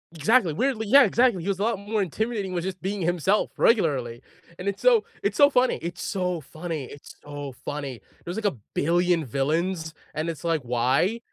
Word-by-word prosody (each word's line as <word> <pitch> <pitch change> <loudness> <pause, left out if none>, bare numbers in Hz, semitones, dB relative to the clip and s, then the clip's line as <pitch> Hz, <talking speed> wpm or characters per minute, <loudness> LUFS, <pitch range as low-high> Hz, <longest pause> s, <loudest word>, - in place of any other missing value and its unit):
Exactly, 175 - +3
weirdly 230 - -1
Yeah, 275 +6 +8
exactly, 240 -7 +3
he 185 - -3
was 195 -1 -1
a - - 0
lot 225 -3 0
more 205 +1 -1
intimidating 200 +1 -2
with 175 -2 -2
just 185 0 -5
being 195 +1 -3
himself 175 +4 +1
regularly, 135 - +2 0.4
and 180 - -6
it's 200 - -5
so 475 -4 +5 0.2
it's - - -1
so 285 -1 +6
funny. 255 -2 +2
It's 175 +1 -5
so 180 -2 -2
funny. 155 0 -6
It's 140 +3 -12
so 145 -2 -7
funny, 140 -5 -4
there - - -31
was, 180 - -5
like, 220 - -3
a - - -16 0.2
billion 175 +1 +2
villains, 160 +6 -1 0.2
and 155 +2 -2
it's 160 -5 -6
like, 165 -2 +1
"Why?" 125 - +1
175 Hz, 195 wpm, -25 LUFS, 150-210 Hz, 0.4 s, Yeah